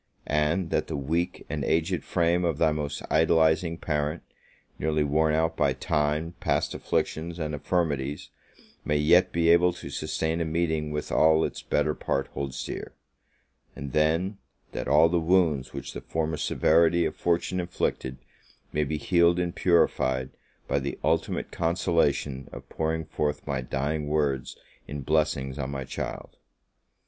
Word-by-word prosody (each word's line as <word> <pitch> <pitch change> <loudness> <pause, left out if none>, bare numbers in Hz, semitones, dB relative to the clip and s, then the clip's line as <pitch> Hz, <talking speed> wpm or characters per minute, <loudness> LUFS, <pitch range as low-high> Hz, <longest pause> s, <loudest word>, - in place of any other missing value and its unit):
and 75 +4 0
that - - 0
the - - -3
weak 80 +6 -2
and 75 -1 -3
aged 85 +5 0
frame 85 0 +1
of 85 -4 0
thy 80 0 +4
almost 75 -2 -3
idolizing 80 +1 +3
parent, 75 0 -2 0.6
nearly 75 0 +1
worn 75 +2 +2
out 80 +1 +1
by 75 -4 +2
time, 75 +5 -1
past - - 0
afflictions, 80 +2 -2
and 75 -2 -3
infirmities, 75 -2 -1 0.5
may 75 - +1
yet 90 +5 +4
be 85 -1 +2
able 85 +1 +6
to 90 - -9
sustain 80 +1 -2
a - - +2
meeting 80 -1 -1
with 75 0 -4
all 80 0 +4
its - - -5
better 75 - +1
part 70 -2 -1
holds 70 -1 -4
dear; - - -6 0.8
and 70 -1 -7
then, 80 +6 +1 0.3
that - - -4
all 75 +3 +6
the 85 +1 +1
wounds 80 -6 +2
which - - -7
the - - -6
former 80 -1 -2
severity 85 +3 +3
of - - -2
fortune 85 +1 0
inflicted, 75 -7 -2 0.6
may 75 - +2
be 75 +1 -2
healed 85 +2 +3
and 90 -1 -1
purified 65 -7 +2 0.4
by 70 - +1
the 70 0 -4
ultimate 80 +3 0
consolation 75 -5 0
of - - -10
pouring 80 0 -2
forth 75 -1 -2
my 70 -3 -2
dying 75 +4 -2
words 70 -4 -1 0.3
in 75 0 -5
blessings 70 -2 0
on 70 -1 -2
my 70 -1 -4
child! - - -6
80 Hz, 155 wpm, -27 LUFS, 75-85 Hz, 0.8 s, able